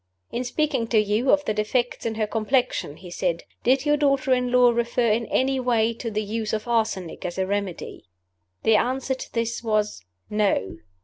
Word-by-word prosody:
"In 240 - -2
speaking 260 -2 0
to 225 - +2
you 215 +4 +2
of 290 0 +4
the 215 - 0
defects 230 +4 -1
in 225 - -3
her 215 -1 0
complexion," 225 - 0
he 180 -2 -11
said, 175 -1 -1 0.2
"did 260 +3 +2
your 295 0 +3
daughter 275 -2 +2
in 250 -1 0
law 250 -1 +6
refer 235 0 +1
in 225 +1 0
any 265 +1 +1
way 235 -2 +2
to 230 0 -5
the 215 0 -2
use 215 +1 -3
of 215 +1 -2
arsenic 220 -7 -1
as 175 0 -4
a 190 - +1
remedy?" 200 -2 -4 0.6
The 220 -1 +5
answer 260 +3 0
to 260 - -8
this 230 0 -2
was, 215 - -1 0.2
"No." 205 - 0
230 Hz, 190 wpm, -24 LUFS, 210-250 Hz, 0.6 s, law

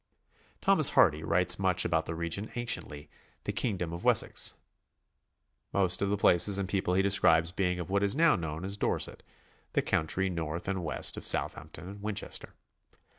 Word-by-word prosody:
Thomas - - +5
Hardy 75 +1 +3
writes 90 +2 +2
much 95 -2 +1
about 80 -1 0
the 80 - -4
region 85 +6 -4
anciently 80 -11 -2 0.4
the - - -3
kingdom 90 -8 -3
of 85 - -7
Wessex, - - +1 1.2
most 95 -2 0
of 100 - 0
the 105 - 0
places 95 +1 +4
and 100 -1 -2
people 95 -2 -1
he 95 - +2
describes 85 -4 +3
being 90 -1 -1
of 90 +2 -6
what 100 0 +1
is 100 0 +3
now 165 +1 +4
known 80 0 -5
as 100 +1 -3
Dorset, - - -2 0.5
the - - +1
country 95 +4 -1
north 85 -1 -5
and 95 -2 -2
west 80 - 0
of - - -4
Southampton 80 +4 -2
and 100 +1 -10
Winchester. 105 -1 -3
90 Hz, 170 wpm, -29 LUFS, 85-100 Hz, 1.2 s, Thomas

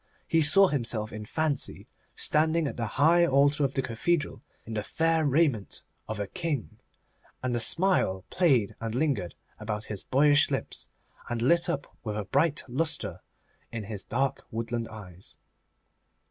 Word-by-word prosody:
He 165 - +3
saw 195 +6 +7
himself 115 -5 -2
in 105 0 -6
fancy 155 +4 -2 0.3
standing 160 +1 +2
at - - -5
the 115 -2 -2
high 165 +5 +5
altar 145 -1 +3
of 135 -1 0
the 135 - +1
cathedral 140 +6 -1 0.2
in 115 - -7
the 105 - -1
fair 160 +6 +1
raiment 140 -8 +1 0.2
of 110 -1 -4
a 100 - -1
King, 155 - -4 0.6
and 125 -1 0
a - - 0
smile 115 - +1
played 135 - +2
and 115 0 -3
lingered 130 - -1 0.2
about 105 0 -4
his 100 - -4
boyish 145 +2 +4
lips, - - -3 0.4
and 115 -1 -2
lit 170 +7 +3
up 145 -4 -4
with 105 -2 -3
a 105 - -2
bright 145 - +1
lustre 150 +5 -1 0.5
his 105 -3 -5
dark 135 +3 -1
woodland 115 0 -3
eyes. 95 -4 -12
135 Hz, 150 wpm, -28 LUFS, 110-155 Hz, 0.6 s, saw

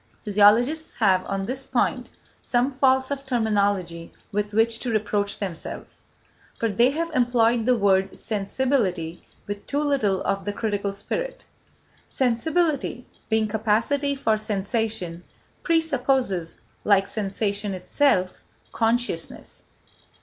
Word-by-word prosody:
Physiologists 225 +10 +3
have, 190 -4 +3
on 195 0 -2
this 260 +4 -3
point, 250 0 0 0.3
some 245 +3 +1
faults 260 0 +2
of 275 -1 -3
terminology 200 -9 0 0.2
with 210 0 -1
which 225 +1 +2
to 250 - -3
reproach 205 -2 -1
themselves: 185 -5 -6 0.6
for 230 - 0
they 235 +5 +4
have 330 +4 -2
employed 240 -3 +2
the 250 - +5
word 195 -2 +2
sensibility 200 - -1 0.2
with 205 0 -5
too 290 +1 0
little 225 -10 +1
of 195 0 -1
the 205 - -3
critical 205 -2 -2
spirit. - - -5 0.6
Sensibility, 270 +1 0 0.2
being 220 -1 +2
capacity 230 +7 +1
for 225 -5 +1
sensation, 210 -4 -2 0.4
presupposes, 265 - 0 0.2
like 195 -2 +4
sensation 200 0 -2
itself, 185 -2 +1 0.3
consciousness. 240 +2 -1
220 Hz, 115 wpm, -24 LUFS, 200-260 Hz, 0.6 s, the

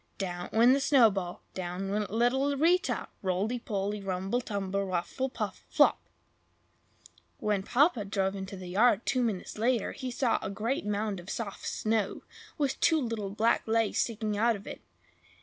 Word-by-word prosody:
Down 175 -2 -4
went 235 +3 +6
the 275 - +3
snowball! 220 -11 +3
Down 185 +1 -4
went 210 0 -1
little 265 +6 +1
Rita! 355 +7 +2
roly 195 +6 -1
poly, 205 -2 -3
rumble 195 +5 -1
tumble, 200 -3 -2
ruffle 190 +8 -2
puffle, - - -5
flop! - - +4 1.4
When 210 -2 0
Papa 250 - +3
drove 195 -1 -1
into 195 0 -6
the 185 - -8
yard, 215 +3 +3
two 255 - +1
minutes 215 -3 -2
later, 235 -1 +1
he 260 -2 -5
saw 245 -1 +1
a - - -4
great 215 +4 -2
mound 210 -1 -1
of 175 +2 -11
soft 210 -4 -5
snow, 215 -2 -1 0.3
with 280 -3 0
two 320 -1 +4
little 225 -6 -3
black 215 +4 +2
legs 225 -1 +1
sticking 215 -2 -1
out 230 +2 +3
of 200 - -10
it. - - -8
215 Hz, 160 wpm, -29 LUFS, 195-245 Hz, 1.4 s, went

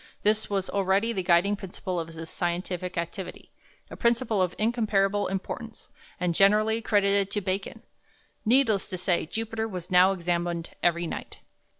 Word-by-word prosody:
This 215 +1 +1
was 195 -2 -1
already 200 +3 +1
the 190 - -1
guiding 180 +3 +3
principle 185 -2 -5
of 165 - -4
his 165 0 -8
scientific 180 +1 -3
activity, 170 +3 -5 0.4
a - - -6
principle 235 -3 +1
of 180 -1 0
incomparable 210 -3 +1
importance, 220 +4 -6 0.3
and 180 -1 0
generally 215 +4 +4
credited 200 -2 +2
to 205 - -1
Bacon. 195 0 -3 0.6
Needless 225 -3 +3
to 185 - -5
say, 180 -3 0
Jupiter 225 +3 -3
was 180 -5 -7
now 180 +1 +6
examined 175 -2 -2
every 170 0 +2
night. - - -6
195 Hz, 150 wpm, -27 LUFS, 180-215 Hz, 0.6 s, now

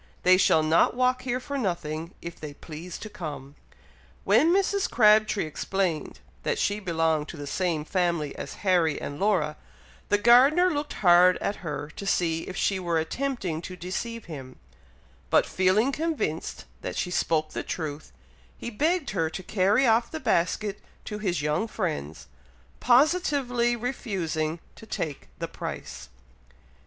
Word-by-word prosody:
They 185 0 +7
shall 160 -4 +4
not 160 +8 +3
walk 255 0 +2
here 250 -1 -2
for 280 +2 -4
nothing, 170 -5 -3
if 170 0 -7
they 150 -2 -7
please 165 +4 -8
to - - -8
come!" 150 -9 -7 0.7
When 330 - +4
Mrs. 395 +1 +2
Crabtree 215 -3 +4
explained 170 +1 -2 0.2
that 480 - -1
she 205 - 0
belonged 165 -5 0
to 165 - -8
the 145 - -6
same 160 0 -1
family 170 -5 0
as 140 - -6
Harry 175 -5 +3
and 145 +1 -6
Laura, 175 -7 +1 0.5
the 205 - +4
gardener 270 - +6
looked 290 -1 -3
hard 180 +1 +7
at 205 - -2
her 150 -2 -5
to 200 - -5
see 165 -4 0
if 185 - -6
she 195 -2 +1
were 170 -2 0
attempting 185 - -2
to 185 - -7
deceive 205 +6 -5
him; 135 -6 -9 0.7
but - - +4
feeling 190 +8 +2
convinced 300 - -3 0.2
that - - -5
she 180 - -2
spoke 155 -2 0
the - - -3
truth, 150 - -5 0.5
he 235 - -6
begged 310 - 0
her 165 -5 0
to 185 - -7
carry 205 +7 +2
off 230 0 +3
the 315 - -5
basket 200 - 0 0.3
to 210 -1 -5
his 180 -7 -1
young 150 +9 0
friends, 155 - -4 0.5
positively 255 -3 +3
refusing 180 - -2 0.2
to 220 - -13
take 150 -8 -4
the - - -4
price. - - -7
185 Hz, 150 wpm, -26 LUFS, 160-235 Hz, 0.7 s, They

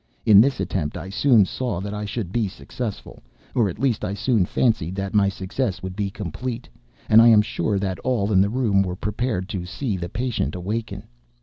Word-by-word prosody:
In 105 -2 +8
this 135 +3 +1
attempt 75 -6 -2
I 95 - -7
soon 115 -2 +4
saw 120 -3 -3
that 100 +2 -5
I 105 0 -4
should 100 -3 -4
be 115 -1 0
successful—or 105 - -5
at 85 - -7
least 125 -2 0
I 100 - -2
soon 110 -3 +1
fancied 95 -8 0
that 100 0 -4
my 100 -2 +4
success 100 +2 -3
would 95 -1 -5
be 100 -1 -1
complete—and 105 - -1
I 115 - +7
am 110 -2 +7
sure 105 0 -1
that 95 -2 -2
all 115 -5 0
in 95 -2 +5
the 100 - +2
room 110 -5 +2
were 90 -2 -2
prepared 105 -1 -2
to 95 -4 -3
see 105 +1 -3
the 85 -1 -5
patient 120 -2 -2
awaken. 105 +6 -4
105 Hz, 195 wpm, -23 LUFS, 95-115 Hz, -, In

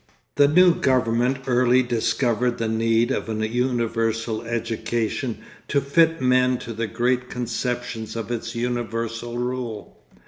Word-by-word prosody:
The 145 - +5
new 175 +4 +6
government 130 -1 +1
early 125 0 +3
discovered 120 0 0
the 115 - -1
need 115 +2 +2
of 125 - -2
a 110 0 -1
universal 115 -2 -1
education 115 0 -2 0.3
to 140 - +2
fit 165 +4 +3
men 125 0 +3
to 115 -1 -7
the 115 +1 -2
great 125 +3 0
conceptions 120 -2 -3
of 115 0 -4
its 115 -1 -4
universal 120 -1 -3
rule. 120 -4 -4
120 Hz, 130 wpm, -23 LUFS, 115-125 Hz, 0.3 s, new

